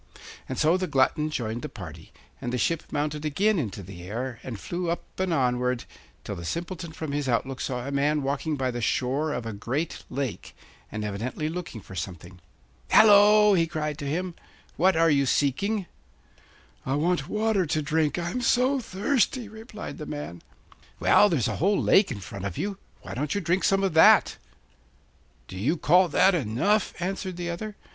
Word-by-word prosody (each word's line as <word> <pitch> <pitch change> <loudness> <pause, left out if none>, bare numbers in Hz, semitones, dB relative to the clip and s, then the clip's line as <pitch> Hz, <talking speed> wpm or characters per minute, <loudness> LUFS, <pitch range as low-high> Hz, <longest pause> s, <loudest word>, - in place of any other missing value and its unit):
And 130 - -4
so 160 +3 +3
the 185 0 -2
glutton 150 +2 +2
joined 120 -5 -3
the - - -5
party, 85 -4 -10 0.3
and 120 - -3
the 125 - -1
ship 165 +7 0
mounted 150 +1 -2
again 195 +7 +1
into 105 -7 -4
the 90 -1 -10
air, 120 +6 -5
and 115 -5 -7
flew 175 - -3
up 170 - -2 0.2
and 190 -1 0
onward, 125 -4 +1 0.4
till - - -5
the 85 - -8
Simpleton 170 - -4
from 160 -2 -5
his 145 -2 -1
outlook 130 +2 -1
saw 125 -2 -3
a 140 - -4
man 145 +1 +1
walking 145 +3 -1
by 130 -2 -1
the 120 0 -4
shore 135 +7 0
of 125 -5 -3
a 115 - -4
great 130 +10 -3
lake, 130 -4 -4 0.4
and 105 - -4
evidently 115 +9 -3
looking 165 -9 -6
for 95 - -13
something. 90 +1 -7 0.5
'Hallo!' 210 0 +7
he 165 -3 +3
cried 150 -2 -3
to 145 - -4
him,' 180 +4 -2 0.4
what 185 +1 +3
are 165 0 +4
you 140 -2 +2
seeking? 190 - +1 1.0
'I 135 - -1
want 155 -1 0
water 210 -4 +1
to 155 +1 0
drink, 155 +1 +1
I'm 175 +8 -2
so 255 +3 +3
thirsty,' 235 +3 0
replied 220 -2 -9
the 150 - -6
man. 115 - -6 0.6
'Well, 210 - +5
there's 140 - +1
a - - -2
whole 200 +4 +2
lake 195 - +4
in 100 - -5
front 95 +2 -7
of 95 -3 -4
you; 200 -1 -3 0.2
why - - -7
don't 145 +6 -2
you - - +1
drink 180 +1 0
some 195 0 +3
of 195 - +1
that?' 160 - +6 1.1
'Do 95 - -8
you 145 - +1
call 180 +5 +4
that 195 +3 +4
enough?' 170 - +1
answered 185 0 -3
the 175 -1 -3
other. 210 +5 -6
150 Hz, 185 wpm, -26 LUFS, 125-185 Hz, 1.1 s, Hallo